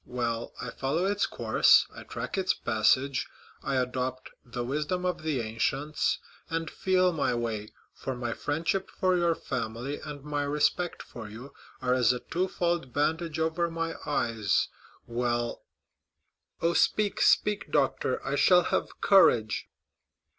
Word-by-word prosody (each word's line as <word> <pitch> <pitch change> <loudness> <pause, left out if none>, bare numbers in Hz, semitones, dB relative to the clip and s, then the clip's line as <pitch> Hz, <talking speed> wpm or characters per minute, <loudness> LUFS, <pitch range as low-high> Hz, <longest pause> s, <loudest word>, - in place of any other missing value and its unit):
Well, 120 -2 -2
I 125 - -5
follow 150 +7 -1
its 200 +1 +1
course, - - +4
I - - -8
track - - -5
its 190 -1 +1
passage; 125 +5 +2 0.3
I 135 - -2
adopt 130 0 -2
the 120 0 -5
wisdom 150 +8 -2
of 180 - -1
the 155 -5 -1
ancients, 135 +7 0 0.3
and 165 -1 -2
feel 185 -1 +2
my 145 -6 0
way, 110 -3 -3 0.2
for 130 - -5
my 120 -1 -3
friendship 165 +6 -1
for 185 -1 +1
your 170 -2 +2
family 120 +5 -4
and 145 -2 -7
my 145 0 -2
respect 150 +4 0
for 115 -3 -9
you 120 +6 -10 0.3
are 125 -1 +2
as 125 -2 +4
a 125 - -3
twofold 175 -4 -1
bandage 160 +3 0
over 160 +2 0
my 165 0 -2
eyes; 115 -7 +1 0.4
well——" 120 0 -1 1.0
"Oh, 170 +1 +3
speak, 210 +3 +2
speak, 210 -1 +3
doctor; - - +1
I - - -1
shall 180 -1 +6
have - - -2
courage." 120 - +4
145 Hz, 140 wpm, -28 LUFS, 120-170 Hz, 1.0 s, shall